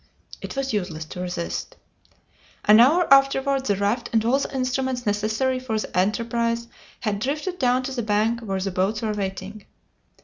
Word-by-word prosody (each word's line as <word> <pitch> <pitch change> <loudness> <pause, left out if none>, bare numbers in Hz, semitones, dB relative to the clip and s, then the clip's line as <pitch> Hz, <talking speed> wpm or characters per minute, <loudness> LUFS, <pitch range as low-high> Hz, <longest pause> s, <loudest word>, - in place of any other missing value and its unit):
It - - -6
was 270 -2 -2
useless 180 -6 -3
to 170 - -9
resist. 175 -1 -4 0.9
An 210 +1 +7
hour 310 +9 +6
afterward 275 0 +3
the 205 - +2
raft 205 +5 -1
and 225 -1 +2
all 260 +4 +3
the - - -3
instruments 255 -1 -1
necessary 220 +5 0
for 245 -4 -2
the 215 - -5
enterprise 230 +4 0 0.3
had 210 -4 -1
drifted 300 - -3
down 255 0 +2
to 270 - -4
the 255 -2 -2
bank 220 +2 +1
where 195 -5 -3
the 195 +1 -2
boats 195 +5 -1
were 215 -1 0
waiting. 195 +1 -5
230 Hz, 170 wpm, -24 LUFS, 205-260 Hz, 0.9 s, An